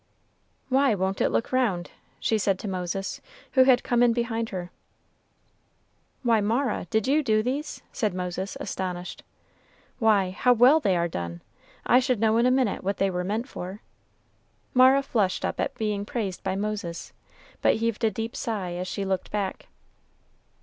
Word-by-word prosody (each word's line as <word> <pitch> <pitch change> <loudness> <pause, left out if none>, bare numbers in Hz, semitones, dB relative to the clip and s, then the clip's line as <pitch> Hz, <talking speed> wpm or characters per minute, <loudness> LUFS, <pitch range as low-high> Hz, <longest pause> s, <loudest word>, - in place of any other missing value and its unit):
"Why 265 -3 +3
won't 190 0 -1
it - - +3
look - - -1
round?" 215 -9 0 0.3
she 220 - +1
said 195 -2 +1
to 210 - -6
Moses, 190 +1 -3 0.3
who 260 -2 +5
had 255 -2 +5
come 240 -1 +1
in 240 -1 +5
behind 230 -1 -2
her. 180 -2 -6 1.5
"Why, 230 -3 +3
Mara, 235 +6 0
did 220 -1 +1
you 295 +3 +3
do 215 -6 +2
these?" 275 +6 -3
said 215 -5 0
Moses, 180 +1 -4
astonished; 180 -1 -4 0.8
"why, 205 -5 +3
how 250 +6 +3
well 250 +7 +6
they 195 - +1
are 170 0 +1
done! 85 - -6 0.4
I 245 - +5
should 255 -3 0
know 220 0 +3
in 235 +2 +4
a - - +5
minute 255 -4 +1
what 195 +2 -1
they 195 0 +1
were 180 0 -2
meant 215 +7 -2
for." 190 -2 -7 0.9
Mara 260 +2 +6
flushed 210 -8 0
up - - -3
at - - -1
being 210 -2 -2
praised 205 -4 -4
by 190 0 -2
Moses, 200 -4 -4 0.5
but - - +4
heaved 230 0 -2
a 225 - +4
deep 225 +3 -5
sigh 200 -6 -3
as 180 +1 -4
she 195 +1 -3
looked 190 -1 -2
back. 200 -2 -3
215 Hz, 170 wpm, -26 LUFS, 190-240 Hz, 1.5 s, well